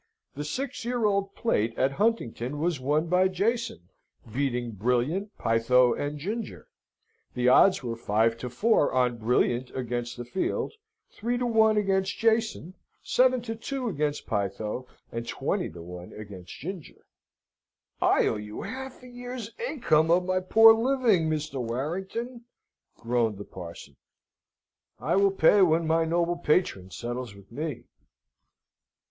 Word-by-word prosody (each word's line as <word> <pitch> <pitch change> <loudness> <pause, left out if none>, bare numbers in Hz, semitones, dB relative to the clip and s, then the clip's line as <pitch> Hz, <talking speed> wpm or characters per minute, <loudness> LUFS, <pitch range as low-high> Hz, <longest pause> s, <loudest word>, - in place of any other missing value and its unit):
"The 145 - -5
Six 260 - -4
Year 240 -1 -1
Old 200 -1 0
Plate 115 - 0
at 135 - +2
Huntingdon 145 - -1
was 165 -2 0
won 150 +5 +1
by 180 +2 +3
Jason, 200 - -2 0.4
beating 125 -3 -1
Brilliant, 125 - -1
Pytho, 120 +2 +3
and 145 +1 -3
Ginger. 210 +8 -5 0.7
The 125 0 +1
odds 185 +7 +5
were 115 -2 -3
five 115 +1 +1
to 125 - -5
four 205 - +2
on 125 -2 +2
Brilliant 120 +2 +1
against 120 -1 -3
the 120 - -6
field, 155 - -2 0.4
three 240 +3 -2
to 250 - -1
one 220 -2 +4
against 195 -1 +1
Jason, 220 -6 +1 0.3
seven 255 -1 +3
to 225 -2 -4
two 255 +2 -3
against 150 -5 -2
Pytho, 105 +3 -3 0.2
and 115 0 -5
twenty - - -2
to 85 +1 -10
one 90 +1 -9
against 100 -4 -10
Ginger." 175 +1 -8 1.0
"I - - +4
owe - - 0
you 105 0 -7
a - - -5
half 265 0 -7
year's 245 -2 -7 0.2
income 160 - +2
of 180 +2 +4
my 185 0 +1
poor 225 +4 +7
living, 225 -8 +2
Mr. 155 -3 -2
Warrington," 190 - -4 0.5
groaned 115 -3 0
the 100 - -8
parson. 85 -2 -10 1.0
"I - - 0
will 200 +1 +5
pay 195 +1 +4
when 165 -2 +4
my 165 +1 +2
noble 170 +1 0
patron 150 - +1
settles 120 +1 -5
with 100 +1 -17
me." 150 +1 -4
155 Hz, 140 wpm, -27 LUFS, -, 1.0 s, poor